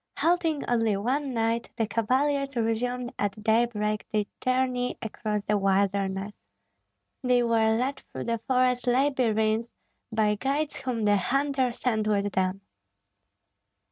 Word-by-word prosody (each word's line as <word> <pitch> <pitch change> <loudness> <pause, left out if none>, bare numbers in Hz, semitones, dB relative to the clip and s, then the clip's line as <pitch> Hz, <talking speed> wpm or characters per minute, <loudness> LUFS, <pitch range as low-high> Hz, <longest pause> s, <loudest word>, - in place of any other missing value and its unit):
Halting 330 -3 +1
only 225 -4 +2
one 265 +7 -1
night, 230 0 0
the 225 - +1
cavaliers 275 +5 0
resumed 240 +2 -1
at 205 +1 -2
daybreak 215 -1 +1
their 210 -1 +1 0.2
journey 255 -1 0
across 215 -2 -3
the 210 0 +1
wilderness. 195 0 0 0.9
They 250 -1 +3
were 225 -1 +3
led 265 +3 -1
through - - -5
the 230 0 -1
forest 255 -1 +2
labyrinths 235 -4 +1 0.4
by 215 -1 +2
guides 285 +3 -1
whom 245 -4 -3
the 205 -1 +4
hunter 270 +4 +1
sent 220 -3 -1
with 205 -1 +1
them. 185 +1 0
230 Hz, 125 wpm, -27 LUFS, 210-255 Hz, 0.9 s, the